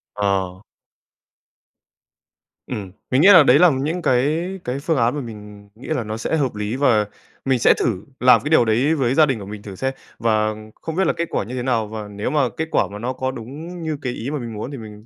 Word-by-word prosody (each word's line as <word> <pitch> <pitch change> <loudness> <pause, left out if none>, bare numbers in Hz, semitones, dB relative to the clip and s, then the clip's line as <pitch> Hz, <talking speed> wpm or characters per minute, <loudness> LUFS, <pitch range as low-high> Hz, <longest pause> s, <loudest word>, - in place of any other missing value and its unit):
Ờ. 95 -2 -1 2.1
Ừm, 100 -3 -5 0.2
mình 130 +3 +4
nghĩ 190 - +7
là 180 -7 +9
đấy 140 +3 +5
là 180 -1 +7
những 150 +7 -2
cái 150 +6 +1 0.2
cái 125 +2 -3
phương 155 +1 0
án 120 +2 +2
mà 145 - -3
mình 105 -3 -10
nghĩ 120 - -12
là 155 -7 -1
nó 110 0 -5
sẽ 135 +8 -1
hợp 130 -7 -1
lý 105 +3 -3
và 120 -6 +3 0.4
mình 130 -2 +2
sẽ - - +6
thử 105 -5 -2
làm 125 0 +6
cái 150 - -2
điều 155 -7 +5
đấy 125 +8 +2
với 130 -4 +1
gia 155 - +6
đình 135 -6 -1
của 100 - -8
mình 105 0 -8
thử 100 -2 -8
xem. 130 +6 -2 0.3
Và 110 -2 +1 0.3
không 160 -1 -5
biết 190 -3 +2
là - - +2
kết 170 - -3
quả - - -1
như 125 +5 -7
thế 125 - -3
nào, 115 -4 0
và 105 -1 -6
nếu 105 +2 -4
mà 135 -3 +1
kết 160 - -2
quả - - +2
mà 105 - -7
nó 125 +3 -2
có 130 0 -2
đúng 150 +9 -8
như 155 -2 -2
cái 125 -3 -3
ý 120 +3 -5
mà 150 - -2
mình 120 -2 -6
muốn 110 +6 -5
thì 140 - -6
mình 105 -1 -11
125 Hz, 245 wpm, -21 LUFS, 110-145 Hz, 2.1 s, là